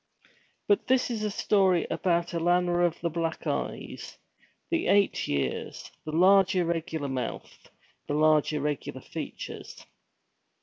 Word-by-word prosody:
But 410 -1 +2
this 255 -1 +2 0.2
story 190 -4 +3
is - - -7
about 170 -1 0
Alanna 175 +1 +2
of 170 - -6
the 170 - 0
black 165 0 -3
eyes, - - -4 0.5
the 335 0 0
eight 200 -1 +3
years, 70 -3 -3
the 155 - -4
large 190 +3 +5
irregular 165 -3 -1
mouth, 130 -3 -5 0.4
the 145 - -1
large 155 0 +4
irregular 150 -1 -3
features. - - -8
170 Hz, 120 wpm, -28 LUFS, 155-185 Hz, 0.5 s, large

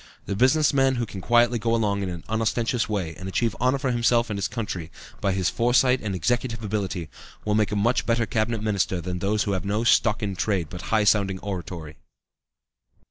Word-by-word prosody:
The 100 - -3
business 145 +7 +3
man 135 -1 +3
who 120 -1 -1
quietly 120 +4 +2
can 115 - -1
go 115 - +3
along 100 -3 0
in 95 - -2
an 85 -2 -6
unostentatious 115 +2 0
way, 95 -6 -2
and 95 +2 -6
achieve 115 +3 0
honor 130 +2 +3
for 135 -1 -1
himself 120 -1 +2
and 105 - -2
his 100 - 0
country, 95 -8 -5 0.3
by 100 - +1
his 95 -2 0
foresight 125 +4 +3
and 100 -3 -3
executive 115 +5 -1
ability, 100 -5 -3 0.4
will 105 - +1
make 105 -1 +2
a - - -1
much 115 +4 +1
better 115 0 +2
Cabinet 110 0 -1
Minister 100 -4 0
than 90 +1 -4
those 105 +3 +1
who 100 - -2
have 95 -2 -1
no 105 +3 -1
stock 110 -2 +3
in 100 -2 -2
trade 90 -5 -1
but 90 - -6
high 110 -1 +3
sounding 100 -2 +2
oratory." 85 -5 -6
105 Hz, 205 wpm, -25 LUFS, 95-120 Hz, 0.4 s, business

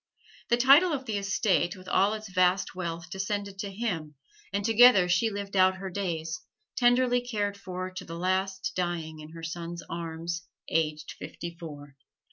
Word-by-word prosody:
The 235 - +4
title 285 +8 +6
of 265 -2 -3
the 215 -4 -1
estate 195 -3 +1
with 185 -1 -13
all 195 +3 +3
its 215 0 -7
vast 185 0 +3
wealth 170 -1 -5
descended 195 +1 -3
to 200 0 -3
him, 180 -8 -3 0.4
and 200 0 -1
together 225 -4 +7
she 225 +6 +3
lived 200 -1 -5
out 185 0 +5
her 190 0 -6
days, 170 +1 -3 0.3
tenderly 245 0 +4
cared 210 -5 -2
for 185 -1 -5
to 185 0 -7
the 165 -1 -7
last, 190 +2 0
dying 170 -3 -2
in 155 +1 -11
her 165 -1 -9
son's 170 +1 -5
arms, 170 +1 -4 0.3
aged 155 -1 -1
fifty 170 0 -7
four. 145 -4 -10
185 Hz, 165 wpm, -28 LUFS, 170-205 Hz, 0.4 s, together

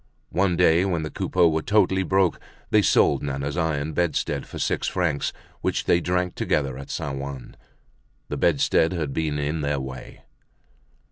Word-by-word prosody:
One 90 -1 +1
day 85 0 +4
when 90 -5 -1
the 75 - -5
Coupeaus 85 -3 +2
were 80 - 0
totally 95 0 +2
broke 95 -1 +2 0.3
they 105 - +5
sold - - +3
Nana's 70 +1 -3
iron 80 -3 -1
bedstead 85 -1 -1
for - - -8
six - - -1
francs, 85 -6 0 0.3
which - - -1
they 85 - +3
drank 90 0 0
together 70 -3 -1
at 70 - -9
Saint 70 -1 -4
Ouen. 70 -3 -7 0.7
The - - -4
bedstead 80 +2 +2
had 80 -6 -3
been 75 -1 -1
in 75 +2 -2
their 70 -1 0
way. 65 -1 -8
80 Hz, 160 wpm, -24 LUFS, 70-90 Hz, 0.7 s, they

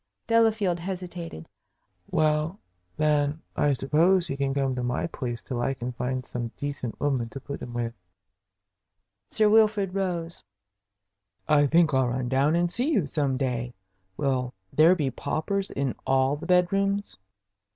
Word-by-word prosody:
Delafield 220 -6 +2
hesitated. 175 - -6 0.6
"Well, 155 +3 +1 0.4
then, 150 0 +2 0.2
I 145 -1 +2
suppose, 165 +7 +3
he 135 - -3
can 140 -1 -1
come 135 -1 0
to 125 - -3
my 125 0 -1
place 120 -7 -5
till 125 -4 -3
I 135 +2 0
can 125 0 -4
find 125 +1 -3
some 120 -1 -4
decent 140 -5 -5
woman 130 -5 0
to 135 - -7
put 140 +1 -7
him 120 - -6
with." 120 -1 -3 1.4
Sir 215 - +3
Wilfrid 210 -3 +4
rose. 175 -4 -3 1.0
"I 145 -1 +5
think 165 +1 +4
I'll 130 -1 +3
run 125 0 -2
down 140 +4 +3
and 175 0 +1
see 250 +6 0
you 210 - +2
some 140 -2 0
day. 125 -3 -2 0.4
Will 130 -4 -1 0.2
there 165 +4 +6
be 145 -6 -1
paupers 195 +10 -2
in 135 -2 -2
all 135 +1 +3
the 150 +3 -8
bedrooms?" 195 - +1
145 Hz, 150 wpm, -26 LUFS, 130-180 Hz, 1.4 s, there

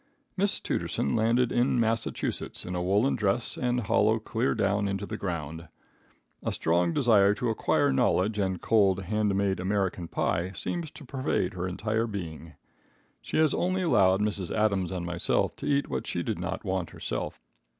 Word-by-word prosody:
Miss 200 +1 +3
Tooterson 70 - -1
landed 115 +2 +2
in 120 0 +2
Massachusetts 115 0 -1
in 90 - -4
a 90 - -1
woolen 100 +9 +2
dress 105 +2 0
and 125 0 0
hollow 110 +1 +3
clear 110 +3 -1
down 100 0 +1
into 100 0 -2
the - - -5
ground. 80 -3 -5 0.7
A - - -2
strong 85 +1 +1
desire 105 -4 +4
to 115 +1 -1
acquire 140 +5 +2
knowledge 110 -5 +2
and 95 -2 0
cold, 100 -4 +3
hand 105 +1 0
made 100 -1 +1
American 95 -2 -1
pie 85 +3 -1
seems 170 +6 -4
to - - -12
pervade 130 -9 -1
her 90 0 -3
entire 110 +5 -1
being. 85 -5 -6 0.7
She - - -3
has 155 -2 +4
only 185 +1 0
allowed 95 - +4
Mrs. 100 -4 -1
Adams 100 -4 +1
and 90 -2 -3
myself 85 0 0
to - - -5
eat 140 0 +2
what 65 - -3
she - - -2
did - - -3
not - - -4
want 95 -3 -2
herself. - - -5
100 Hz, 170 wpm, -28 LUFS, 90-115 Hz, 0.7 s, desire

